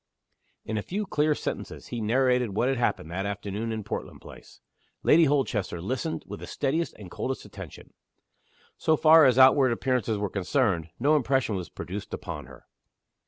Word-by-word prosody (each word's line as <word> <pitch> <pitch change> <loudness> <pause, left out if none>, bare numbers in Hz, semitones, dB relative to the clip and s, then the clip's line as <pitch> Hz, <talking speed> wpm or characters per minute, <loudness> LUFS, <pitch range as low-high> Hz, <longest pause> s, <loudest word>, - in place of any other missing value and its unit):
In 110 0 -2
a - - -3
few 205 - -3
clear 150 -4 +1
sentences - - -6
he 120 - -4
narrated 125 -1 +2
what 120 - +2
had 135 -2 0
happened, 85 -8 -1
that 95 +3 -2
afternoon, 100 +2 -4
in 110 -1 -4
Portland - - -6
Place. - - -14 0.4
Lady 165 +1 +6
Holchester 125 - 0
listened 130 - -3
with - - -8
the - - -8
steadiest 155 +5 -1
and 95 -4 -11
coldest 135 0 -4
attention. - - -11 0.9
So 160 -1 +2
far 160 0 +7
as 130 -2 +4
outward 130 0 +6
appearances 120 -2 0
were 105 0 -1
concerned, 95 - 0
no 145 +5 +3
impression 130 -4 +1
was 90 -3 -5
produced 100 +3 -6
upon - - -7
her. 60 -2 -15
125 Hz, 165 wpm, -27 LUFS, 100-140 Hz, 0.9 s, far